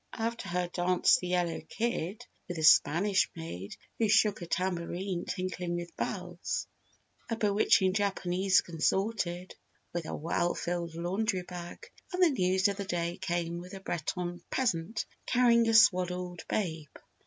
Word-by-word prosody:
After 230 -4 -3
her 180 0 0
danced 175 +1 +3
the 180 - -5
Yellow 175 -2 0
Kid 220 -4 -2 0.2
with 175 - -5
the 160 - -3
Spanish 175 +5 +5
Maid 100 - -7 0.2
who 225 -2 +2
shook 210 -2 +4
a 175 - -6
tambourine 180 +1 -2
tinkling 180 -2 -3
with 175 -1 -6
bells. 180 -3 -3 0.6
A 230 - 0
bewitching 205 -3 +3
Japanese 190 -2 +2
consorted 180 +1 -1 0.4
with 170 -2 -3
a - - -3
well 170 +2 0
filled 170 -1 -3
Laundry 185 +3 -1
Bag 175 -1 -8 0.2
and 365 0 +2
the 340 - +6
News 185 -4 +2
of 200 -1 -2
the 200 - -4
Day 175 -1 -2
came 170 -2 -2
with 180 +2 -9
a - - -7
Breton 175 0 -3
peasant 215 -4 -1 0.2
carrying 235 -2 +4
a - - +2
swaddled 180 -4 +3
babe. 160 -7 -2
180 Hz, 145 wpm, -30 LUFS, 175-200 Hz, 0.6 s, the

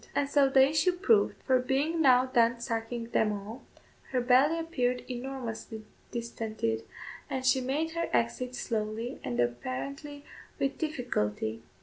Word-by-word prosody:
And 285 - +2
so 280 -1 +4
the 265 0 +6
issue 310 +5 +2
proved; 410 +4 +2
for 260 -1 +3
being 280 +6 0
now 255 -3 +6
done 235 -2 +2
sucking 230 0 -4
them 215 - +2
all, 210 +5 -6 0.5
her 255 - 0
belly 260 +6 +4
appeared 250 -7 -1
enormously 240 -4 -6 0.2
distended, 225 -1 -3 0.5
and 260 -1 -3
she 260 0 +4
made 290 +6 -1
her 335 0 -2
exit 245 +2 0
slowly 225 +2 -3
and 120 -1 -3
apparently 135 - -3 0.3
with 275 0 -1
difficulty. 115 - -2
250 Hz, 135 wpm, -29 LUFS, 225-275 Hz, 0.5 s, the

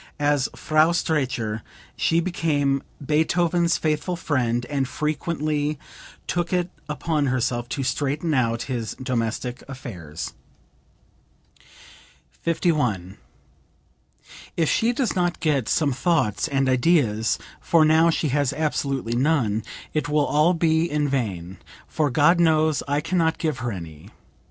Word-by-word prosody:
As 145 -2 +2
Frau 155 +1 +3
Streicher 125 -10 -1 0.3
she 165 - +2
became 145 -6 0 0.2
Beethoven's 170 +3 +2
faithful 155 +3 -1
friend 125 -7 0
and 135 0 -1
frequently 150 0 -1 0.5
took 175 -1 -1
it 180 -1 0 0.2
upon 150 -1 0
herself 120 -1 -1
to 135 - -2
straighten 145 +5 -1
out 115 -3 +1
his 120 -4 -4
domestic 125 -1 -3
affairs.) 90 - -7 2.0
51. 135 - -1 1.4
"If 165 -2 +2
she 230 +2 +2
does 245 -2 -1
not 175 -1 0
get 140 -8 0
some 150 -3 +2
thoughts 125 - +1
and 135 -3 +1
ideas 125 -5 +2 0.2
(for 165 -2 +4
now 160 +2 +5
she 160 -2 0
has 140 0 +1
absolutely 140 -6 -1
none), 125 -6 +1 0.3
it 155 -1 -1
will 150 -1 +2
all 155 +5 +3
be 165 0 +2
in 150 0 0
vain, 95 -9 -3 0.3
for 150 -2 0
God 150 +6 +4
knows, 155 -2 +3
I 145 +1 +1
can 185 +3 -1
not 160 -1 +2
give 155 -6 -2
her 120 -1 -2
any. 80 -6 -9
145 Hz, 125 wpm, -24 LUFS, 125-160 Hz, 2.0 s, now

